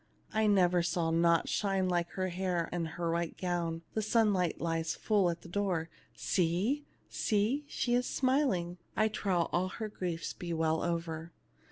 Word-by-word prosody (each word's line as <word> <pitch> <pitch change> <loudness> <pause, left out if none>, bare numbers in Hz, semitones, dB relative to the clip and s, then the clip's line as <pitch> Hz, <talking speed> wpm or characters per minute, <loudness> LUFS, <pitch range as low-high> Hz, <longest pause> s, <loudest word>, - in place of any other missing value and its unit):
I 220 0 +3
never 180 -3 +4
saw 170 -1 0
aught 170 0 +3
shine 195 -2 +1
like 175 -1 0
her 185 -1 -1
hair 180 -1 -1
and 170 -2 -1
her 170 -1 0
white 170 0 -2
gown; 170 -2 -2
the 220 - 0
sunlight 210 -6 +2
lies 165 -1 -1
full 205 -5 +2
in 170 - -2
the - - -12
door. 175 -3 -1 0.3
See! 195 - 0 0.2
see! 225 +7 0
she 240 -3 -1
is 245 +1 +2
smiling! 255 -11 +1 0.2
I 215 0 +4
trow 195 -4 0
all 180 +1 +2
her 215 +3 -5
griefs 175 -5 -3
be 175 -1 -5
well 160 0 +1
over." 165 -1 -3
180 Hz, 165 wpm, -32 LUFS, 170-205 Hz, 0.3 s, never